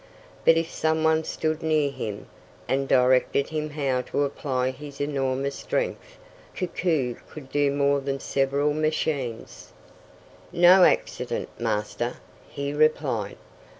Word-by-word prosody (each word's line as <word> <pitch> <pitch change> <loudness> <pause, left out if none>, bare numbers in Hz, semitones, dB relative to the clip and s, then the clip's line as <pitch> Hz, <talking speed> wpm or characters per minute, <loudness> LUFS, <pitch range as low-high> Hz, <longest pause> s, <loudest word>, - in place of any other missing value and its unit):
But 165 - +6
if 165 0 -1
some 160 0 0
one 160 0 +3
stood 155 0 -2
near 155 -3 +1
him, 105 -6 -6 0.4
and 135 +1 0
directed 130 +2 +3
him 155 -1 -3
how 140 -4 -1
to 145 - -1
apply 130 -2 -1
his 140 +1 -11
enormous 140 -1 -1
strength, - - -3 0.4
Koku 160 - -1
could 135 -4 -11
do 145 -1 +2
more 140 0 +2
than 135 0 -3
several 140 +2 0
machines. 150 -6 -3 0.8
"No 180 +1 +7
accident, - - 0
Master," 115 +2 -2 0.3
he 140 0 -4
replied. 145 -9 +1
140 Hz, 120 wpm, -25 LUFS, 130-155 Hz, 0.8 s, No